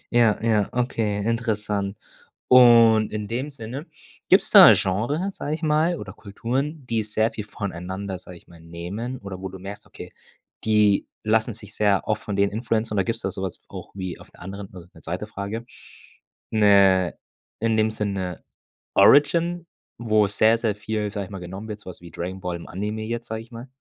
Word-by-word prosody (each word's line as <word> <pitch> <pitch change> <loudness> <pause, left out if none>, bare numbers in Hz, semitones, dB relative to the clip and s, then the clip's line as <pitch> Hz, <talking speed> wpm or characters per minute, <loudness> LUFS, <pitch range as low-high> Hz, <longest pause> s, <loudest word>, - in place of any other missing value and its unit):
Ja, 115 -3 +5
ja, 110 -3 +2
okay, 115 -4 -1
interessant. 105 -3 -1 0.5
Und, 115 -3 +7
in 105 -1 -4
dem 130 +6 -3
Sinne, 135 +4 -7 0.4
gibt's - - +5
da - - +11
'n - - +7
Genre, 120 - 0
sage 150 -4 -4
ich 160 - -10
mal, 160 +3 +2
oder 95 -6 -8
Kulturen, 130 +9 -4
die 115 -2 0
sehr 110 +1 0
viel 105 - -6
voneinander, 95 -1 -5
sage 90 -1 -12
ich - - -20
mal, 85 -1 -16
nehmen 90 +10 -6
oder 100 -4 -8
wo 95 - -4
du 95 - -9
merkst, 100 +2 -9
okay, - - -11 0.5
die 105 -2 +3 0.2
lassen 110 0 +1
sich 105 -1 -11
sehr 105 -3 +2
oft 110 -1 0
von 100 - -4
denen 100 0 +2
beeinflussen? 110 0 -1
Oder 95 - +1
gibt's 115 0 -3
da 95 - -1
so 95 - -5
was 95 -2 -4
v - - -41
auch - - -9
wie 95 -3 -5
auf - - -15
der - - -20
anderen 100 +1 -8
also, 85 -1 -11
'ne 80 - -16
2. 90 +6 -4
Frage, 105 +2 -6 0.9
'ne 100 -4 +4 0.4
in 115 0 +1
dem 110 0 +3
Sinn, 105 -2 -2
'ne 90 -2 -5 0.5
Origin, 170 +4 +4 0.3
wo 110 -3 +2
sehr, 110 +3 +3
sehr 110 -3 0
viel, 105 0 -3
sage 100 -1 -4
ich 100 - -15
mal, 95 - -6
genommen 95 +4 -8
wird, 105 -1 -6
so 100 - -11
was 90 - -10
wie 85 -1 -12
„Dragon 90 +4 -5
Ball“ 90 -2 -3
im 85 - -11
Anime 105 +3 -4
jetzt, 115 +1 -4
sage 110 0 -4
ich 115 - -15
mal? 120 +2 -9
105 Hz, 200 wpm, -24 LUFS, 95-115 Hz, 0.9 s, da